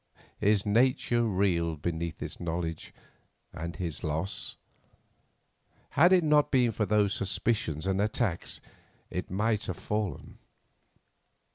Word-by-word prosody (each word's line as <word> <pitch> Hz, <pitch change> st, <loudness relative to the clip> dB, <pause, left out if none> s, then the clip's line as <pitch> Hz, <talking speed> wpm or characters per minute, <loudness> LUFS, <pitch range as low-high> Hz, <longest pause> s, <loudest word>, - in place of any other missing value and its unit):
His 105 Hz, -1 st, +3 dB
nature 120 Hz, +2 st, +2 dB
reeled 90 Hz, -7 st, 0 dB
beneath 85 Hz, -1 st, -2 dB
this -, -, -6 dB
knowledge 85 Hz, -1 st, -3 dB, 0.6 s
and 85 Hz, +2 st, -5 dB
his 85 Hz, -4 st, -4 dB
loss. 80 Hz, +5 st, -1 dB, 1.4 s
Had 175 Hz, +6 st, +5 dB
it 185 Hz, -2 st, +5 dB
not 150 Hz, -1 st, +4 dB
been 125 Hz, -3 st, +3 dB
for 105 Hz, -1 st, -1 dB
those 105 Hz, -2 st, +3 dB
suspicions 95 Hz, -5 st, 0 dB
and 95 Hz, 0 st, +1 dB
attacks 110 Hz, -5 st, -1 dB, 0.5 s
it 90 Hz, -, -4 dB
might 105 Hz, +3 st, 0 dB
have 95 Hz, -, -3 dB
fallen. 105 Hz, -3 st, -4 dB
100 Hz, 115 wpm, -29 LUFS, 85-115 Hz, 1.4 s, Had